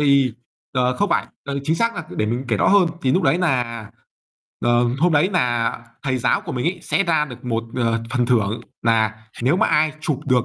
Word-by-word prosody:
Thì 140 -4 +4 0.4
ờ, 125 -1 +1
không 205 - +1
phải, - - +1 0.2
ừ, 140 -1 -3
chính 160 +3 +1
xác 230 +3 +1
là 170 - -5
để 105 - -1
mình 120 +4 -2
kể 110 - +2
rõ - - +2
hơn. 200 -2 +5 0.2
Thì 130 - +2
lúc 185 - +2
đấy 165 - +3
nà 120 - -1 0.7
ờ, 120 0 +4 0.2
hôm 175 +3 +3
đấy 150 +4 +4
nà 120 -9 +1 0.3
thầy 130 -3 0
giáo 125 - +2
của - - -7
mình 125 +3 -2
ấy 175 +1 -1
sẽ - - +1
ra 160 -4 +2
được 125 -2 -11
một, 115 -2 -1
ờ, 115 -2 0
phần 120 0 +1
thưởng 110 -3 +1 0.2
nà 110 -2 +2 0.3
nếu 135 +8 +3
mà - - +3
ai 155 0 +2
chụp 150 -3 -1
được 125 -3 +3
130 Hz, 225 wpm, -21 LUFS, 120-155 Hz, 0.7 s, hơn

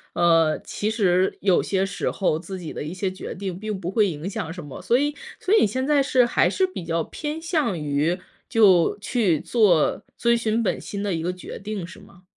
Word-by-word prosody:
呃， 165 -2 +3
其 210 +1 -2
实 190 -4 +2
有 190 -3 +3
些 195 -1 0
时 180 -3 -2
候 180 -5 0
自 190 +2 -7
己 165 - -7
的 - - -5
一 155 - -5
些 185 +1 -2
决 185 - -7
定 190 -2 -5
并 210 0 -4
不 175 - -4
会 210 +2 +3
影 155 +3 -5
响 165 -4 -4
什 175 +1 -7
么， 140 - -9
所 240 - +3
以 290 +1 0 0.2
所 395 - +2
以 - - +5
你 - - +5
现 260 +6 -2
在 290 -2 +4
是 255 -2 +3
还 235 - +2
是 380 -1 +1
比 370 - -7
较 165 0 0
偏 305 +1 -5
向 310 - 0
于， 150 +4 0 0.3
就 190 -7 +4
去 205 - +1
做 200 -10 +2
遵 235 0 +3
循 225 0 0
本 210 - 0
心 200 - -6
的 200 -2 -1
一 165 - -3
个 180 - 0
决 180 - -9
定， 205 -3 -5
是 185 - -12
吗？ 180 +1 -18
195 Hz, 240 characters per minute, -24 LUFS, 175-230 Hz, 0.3 s, 以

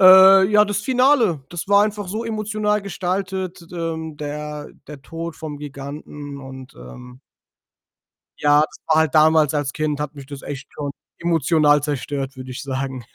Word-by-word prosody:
Äh, 190 +1 +9
ja, 210 0 +6
das 205 -1 -2
Finale, 250 - +2
das 175 -2 -5
war 205 0 +6
einfach 210 -1 -2
so 215 +5 -3
emotional 215 -1 -1
gestaltet, 190 -1 -3
d - - -15
d 175 - -10
ähm, 160 -2 -4
der 150 0 -6 0.2
der 145 -2 -10
Tod 165 +3 -6
vom 150 -2 -7
Giganten 145 0 -8
und, 130 -1 -11
ähm 125 - -12 1.2
Ja, 145 0 +5
das 155 - -1
war 160 - +3
halt 160 -4 +1
damals, 155 -1 +5
als 145 -2 -1
Kind 155 -2 -2
hat 150 0 -4
mich 140 -2 -10
das 140 -1 -9
echt 140 -1 -7
schon 145 -1 -5 0.3
emotional 155 -3 +3
zerstört, 140 -1 -3
würde 130 0 -8
ich 125 - -6
sagen. 130 -2 -4
155 Hz, 170 wpm, -21 LUFS, 140-190 Hz, 1.2 s, Äh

